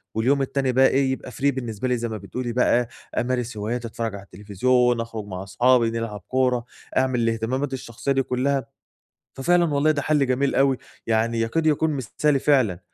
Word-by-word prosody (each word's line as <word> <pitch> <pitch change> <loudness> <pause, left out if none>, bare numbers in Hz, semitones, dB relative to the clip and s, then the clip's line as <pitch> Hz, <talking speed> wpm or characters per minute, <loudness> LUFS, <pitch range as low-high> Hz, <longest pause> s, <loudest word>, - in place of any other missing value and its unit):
واليوم 130 +6 +2
التاني 135 -1 0
بقى 130 +1 +5
إيه، 135 -1 +2
يبقى 130 -1 -5
free - - -13 0.2
بالنسبة 120 -2 -4
لي 125 - +1
زي 120 0 -3
ما 110 - -4
بتقولي 120 +4 -5
بقى 120 -1 +2 0.3
أمارس 120 -2 -1
هواياتي، 115 +3 -3
أتفرج 115 -1 -4
على 100 - -9
التلفزيون، 115 +5 +1
أخرج 115 -2 -6
مع 95 0 -6
صحابي، 120 +4 +3
نلعب 115 -4 -4
كورة، 125 -2 +1 0.3
أعمل 130 -1 +2
الاهتمامات 115 +4 -1
الشخصية 130 +1 -4
دي 135 0 +2
كلّها، 130 +1 0 0.7
ففعلًا 170 +3 +2
والله 145 +2 +3
ده 150 -2 0
حلّ 145 -1 +2
جميل 130 +2 +1
أوي، 135 -1 +3 0.3
يعني 115 +1 +1
يكاد 120 +8 0
يكون 155 +1 +2
مثالي 140 +1 0
فعلًا، 130 -11 +2
125 Hz, 175 wpm, -23 LUFS, 115-135 Hz, 0.7 s, بقى